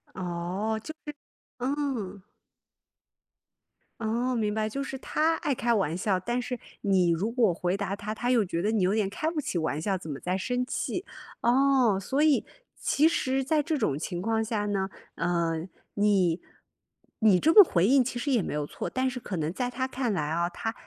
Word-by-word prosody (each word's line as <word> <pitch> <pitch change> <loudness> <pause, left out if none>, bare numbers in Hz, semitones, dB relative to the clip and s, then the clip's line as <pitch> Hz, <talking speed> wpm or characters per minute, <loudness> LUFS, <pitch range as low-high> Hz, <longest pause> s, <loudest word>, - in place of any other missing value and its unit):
哦， 185 +5 -2
就 315 - -6
是 295 - -6 0.4
嗯。 255 -7 -2 1.8
哦， 235 +3 0
明 215 -3 0
白， 215 0 0
就 275 +6 -4
是 270 -1 -4
他 315 +4 +1
爱 290 - -1
开 240 -1 +1
玩 190 -7 +1
笑， 190 0 +1
但 240 +5 -1
是 250 0 -4 0.2
你 190 -3 +3
如 175 +7 0
果 230 -6 +2
回 180 +2 -1
答 200 -1 -2
他， 210 +1 -5
他 245 +3 -1
又 230 -4 +3
觉 170 -2 -2
得 210 +4 +1
你 220 -3 +1
有 185 +2 +2
点 215 -3 +1
开 310 +10 -2
不 320 -2 -2
起 195 - -3
玩 155 -2 -1
笑， 195 +2 0
怎 170 -3 -9
么 140 -2 -5
在 185 +1 -1
生 250 +5 -1
气。 355 +7 -3 0.4
哦， 250 -4 +4
所 270 +9 0
以 305 -3 +3 0.3
其 305 +3 +3
实 265 -5 0
在 300 +3 +2
这 310 +1 -1
种 150 - 0
情 175 +1 -4
况 225 +2 +1
下 215 -2 -2
呢， 195 -2 -1 0.3
嗯， 170 -1 -1 0.3
你 195 -5 +3 0.8
你 210 -5 +5
这 320 - +5
么 420 - +12
回 175 - +2
应 265 +5 +5
其 245 0 -4
实 280 +4 -1
也 240 - +3
没 - - -4
有 150 0 -1
错， - - -5
但 260 0 0
是 255 -1 -5
可 205 - -5
能 160 -1 -1
在 245 +6 -2
他 255 +1 -2
看 260 -2 -2
来 150 -5 -1
啊， 170 +2 +1
他 225 +5 -4
220 Hz, 215 characters per minute, -28 LUFS, 185-260 Hz, 1.8 s, 么